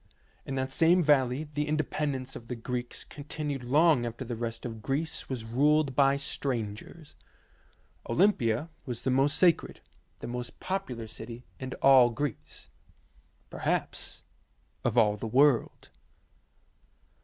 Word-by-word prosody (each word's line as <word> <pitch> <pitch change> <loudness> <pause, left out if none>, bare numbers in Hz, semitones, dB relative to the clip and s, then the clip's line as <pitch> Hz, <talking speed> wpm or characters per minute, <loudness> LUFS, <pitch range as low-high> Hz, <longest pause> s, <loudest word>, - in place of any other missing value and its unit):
In 135 - -3
that 130 0 -2
same 170 +5 +4
valley 135 -2 +3
the 150 -1 -3
inde 155 -1 0
pendence 135 -3 -2
of 115 - -9
the 125 - -4
Greeks 120 +1 -4
continued 145 -2 -5
long 145 +1 +4
after 120 +2 -5
the 120 0 -4
rest 115 0 -4
of 115 -2 -6
Greece 145 +8 -3
was 125 -4 -4
ruled 140 +4 +2
by 140 0 +4
strangers. 135 +1 -4 0.9
Olympia 145 - +2 0.2
was 120 -2 -5
the 130 - +1
most 135 +3 +3
sacred, 175 -3 +3 0.4
the - - -8
most 120 0 -6
popular 160 -12 -3
city 115 +2 -8
in 130 -1 -5
all 130 -3 +7
Greece; 120 +1 -5 0.8
perhaps - - -2 0.6
of 120 0 0
all 105 -2 +4
the 110 - -4
world. 130 +1 +2
130 Hz, 130 wpm, -29 LUFS, 120-150 Hz, 0.9 s, all